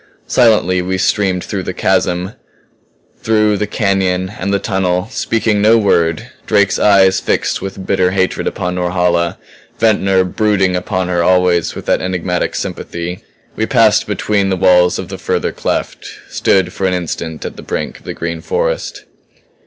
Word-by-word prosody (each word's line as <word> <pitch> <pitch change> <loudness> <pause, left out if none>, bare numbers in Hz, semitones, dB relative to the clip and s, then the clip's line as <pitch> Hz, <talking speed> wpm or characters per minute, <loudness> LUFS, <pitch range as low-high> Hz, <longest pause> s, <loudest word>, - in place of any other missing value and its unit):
Silently 105 -6 +3
we 95 +1 -2
streamed 95 -1 0
through 100 - -4
the - - -5
chasm, 90 +3 0 0.9
through 105 -1 +2
the 105 +1 -2
canyon 95 -2 0
and 100 +2 -2
the 100 - +2
tunnel 95 -1 -1
speaking 110 -2 0
no 110 +2 +5
word, 100 -1 +1 0.2
Drake's 100 -3 +2
eyes 95 -2 +4
fixed - - -1
with 95 -1 -6
bitter 95 -2 +2
hatred 95 0 -1
upon 90 0 -2
Norhala, 90 -1 0 0.4
Ventnor 100 -4 +2
brooding 95 -1 +1
upon 90 0 -2
her 90 -1 0
always 90 -1 +2
with - - -8
that - - +1
enigmatic 90 -1 -2
sympathy. 85 +1 -5 0.4
We 110 - -1
passed 115 -4 +3
between 105 -1 0
the 95 - 0
walls 90 -1 +4
of 95 -1 -6
the 95 - -7
further - - -1
cleft; - - -3 0.2
stood 95 -2 +1
for 95 - -1
an 90 - 0
instant 80 -2 -5
at - - -6
the - - -10
brink - - -4
of - - -25
the - - -6
green 85 -1 -4
forest. - - -2
95 Hz, 160 wpm, -15 LUFS, 90-100 Hz, 0.9 s, no